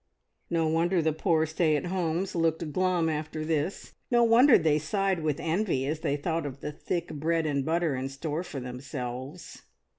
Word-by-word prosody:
No 165 -1 +1
wonder 170 +3 +2
the 160 -1 +1
poor 160 -1 +2
stay 160 0 +1
at 150 - -1
homes 175 0 -1
looked 165 -2 0
glum 185 -2 +2
after 155 0 -3
this; 160 +3 -2 0.2
no 240 -1 +4
wonder 235 +4 +7
they 155 -2 +2
sighed 190 +3 0
with 150 -2 -1
envy 165 -5 0
as 155 +3 -2
they 145 -2 -1
thought 160 +1 -2
of 135 0 -8
the 150 - -5
thick 170 +3 -3
bread 160 +2 0
and 140 -3 0
butter 165 -1 0
in 130 +1 -3
store 150 +4 -3
for 150 -6 -6
themselves. 125 +1 -7
160 Hz, 180 wpm, -28 LUFS, 145-170 Hz, 0.2 s, wonder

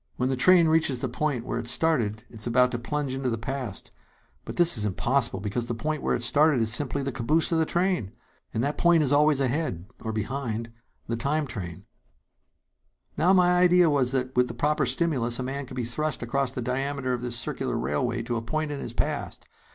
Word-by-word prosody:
"When 125 +1 -1
the 135 - 0
train 170 +5 +5
reaches 155 -5 +2
the 130 - -2
point 125 -1 -2
where - - -2
it - - -6
started, 120 -6 +1
it 115 - -11
is 105 - -3
about 125 +1 +3
to 120 - -3
plunge 140 +2 -3
into 130 -1 -2
the 115 - -1
past; 120 -3 -4 0.5
but - - -6
this 175 -2 +5
is 105 - 0
impossible, 115 +2 +1
because 110 +4 -3
the 120 - -2
point 150 +5 -3
where - - +1
it 120 - -3
started 150 +2 +4
is 110 -1 +1
simply 140 +2 -1
the 135 - -2
caboose 150 +9 +1
of 165 - +2
the 160 - +1
train! 175 - 0 0.4
And 115 - -1
that 145 +2 -2
point 170 -2 +4
is 140 -1 +1
always 150 -1 +4
ahead 130 - -1 0.2
and 110 - -3
behind 115 -1 -3 0.3
the 115 - -2
time 145 +5 0
train. 90 -10 -7 1.3
"Now, 175 +4 +3
my 180 -2 +4
idea 180 -2 +5
was 130 -3 +2
that 130 -1 -2
with 125 0 +3
the 120 - -7
proper 145 +2 +1
stimulus 125 -4 0
a 130 - -3
man 135 +1 -4
could 130 - -9
be 125 - -1
thrust 145 +3 -2
across 135 +3 0
the 125 -2 -4
diameter 135 +1 -2
of 120 - -3
this 120 -1 -3
circular 120 - -2
railway 115 - -1
to 120 0 -2
a - - -3
point 155 +6 -2
in 145 - -4
his - - -6
past. - - -3
130 Hz, 220 wpm, -26 LUFS, 120-150 Hz, 1.3 s, train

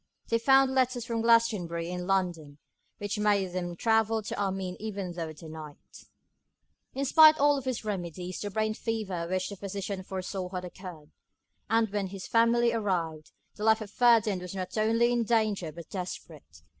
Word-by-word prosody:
They 230 - +2
found 270 +2 +4
letters 255 -2 +1
from 230 -1 -2
Glastonbury 205 -8 +2
in 180 0 -4
London, 175 -7 -1 0.4
which 205 +1 -3
made 200 -3 +1
them 175 -1 -3
travel 225 +2 +2
to - - -4
Armine 190 -2 -2
even 200 -4 -5
through 165 -2 -5
the 160 +2 -11
night. 155 -2 -11 0.9
In 275 +1 -1
spite 310 +3 +8
of - - -5
all 290 -1 +4
his 255 -4 -4
remedies, 180 -2 -4
the 205 - -3
brain 215 +2 -1
fever 205 -7 -3
which 185 +1 -1
the 200 - -7
physician 200 0 -5
foresaw 185 0 -5
had 180 -1 -5
occurred; 175 -4 -10 0.6
and 225 +1 +3
when 205 -2 -1
his 190 0 -8
family 235 +1 +3
arrived, 170 -8 -2 0.3
the 210 - -6
life 220 0 +4
of 215 -2 -8
Ferdinand 225 -5 +3
was 180 +1 -7
not 185 -1 -5
only 230 +2 +2
in 240 -1 +1
danger 215 -7 0
but 170 +2 -11
desperate. 160 - -8
200 Hz, 170 wpm, -29 LUFS, 180-225 Hz, 0.9 s, spite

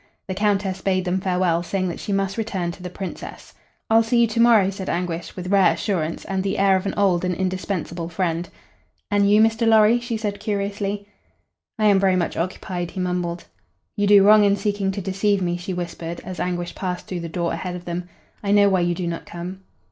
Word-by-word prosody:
The 190 - -2
Countess 195 -1 0
bade 185 -1 0
them 180 +1 0
farewell, 180 -3 +1
saying 185 +1 -2
that 170 - -6
she - - -5
must 195 0 0
return 195 -6 -2
to 180 - -12
the 180 - -5
Princess. 190 +1 -8 0.3
"I'll 225 +1 +5
see 235 +1 +2
you 235 - +4
to 225 - -2
morrow," 225 -5 +5
said 190 -1 -6
Anguish, 170 -1 -3
with 180 0 -5
rare 190 -4 +5
assurance 170 -2 -2
and 190 -1 -1
the 195 0 -2
air 195 -1 +4
of 190 +1 -1
an - - -3
old 190 -4 +2
and 180 -1 0
indispensable 185 -2 -3
friend. 170 0 -2 0.6
"And 200 -1 +3
you, 210 +1 +5
Mr. 225 +1 +2
Lorry?" 220 +1 +5
she 235 -1 -3
said, 210 -2 -3
curiously. 200 0 -3 0.7
"I 215 - +1
am 200 -2 +5
very 190 -1 +3
much 175 -2 -1
occupied," 175 0 -3
he 190 - -7
mumbled. 180 -1 -2 0.5
"You 205 -2 +1
do 200 -1 +7
wrong 210 +1 +7
in 200 0 +4
seeking 205 -1 -1
to 200 - -4
deceive 195 +2 +1
me," 175 -2 -1
she 175 +2 -5
whispered, 170 -1 -5
as 185 -1 -7
Anguish 175 -1 -2
passed 180 -2 -4
through 180 - -4
the 170 -1 -5
door 170 0 -2
ahead 180 -1 -4
of 180 0 -8
them. 175 +1 -4 0.3
"I 200 - -4
know 205 -1 +6
why 190 -1 +2
you 175 0 +1
do 180 - -3
not 170 -1 -4
come." 180 +2 -7
190 Hz, 215 wpm, -22 LUFS, 175-205 Hz, 0.7 s, do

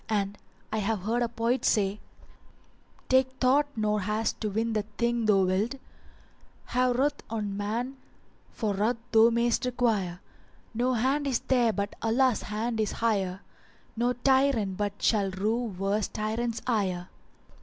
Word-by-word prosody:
And 205 -2 0 0.4
I 220 - +1
have 210 -1 -1
heard 230 +4 0
a 240 - +1
poet 235 +2 0
say:— 205 -1 +2 1.1
Take 260 0 +3
thought 265 +3 +3
nor 210 -1 0
haste 215 +3 -1
to 215 - -1
win 225 +3 -1
the 215 - +1 0.2
thing 235 -1 +1
thou 195 -2 +5
wilt; 195 +8 0 0.5
* - - -32
Have 250 0 +3
ruth 285 +2 +1
on 210 -3 -3
man 230 +6 -3 0.5
for 215 -3 -2
ruth 215 +5 +1
thou 225 0 +7
may'st 235 0 +1
require: 225 -8 0 0.5
No 245 +3 +1
hand 270 +5 +1
is 255 -4 0
there 245 -3 +2
but 200 -1 -3
Allah's 240 +1 +2
hand 220 +2 -3
is 215 -2 0
higher; 195 -5 0 0.3
* - - -32
No 240 +2 +1
tyrant 260 -6 +2
but 205 0 -3
shall 205 -3 +3
rue 215 +6 -1
worse 200 0 -1
tyrant's 225 +2 -3
ire! 190 -7 -1
225 Hz, 155 wpm, -28 LUFS, 205-245 Hz, 1.1 s, thou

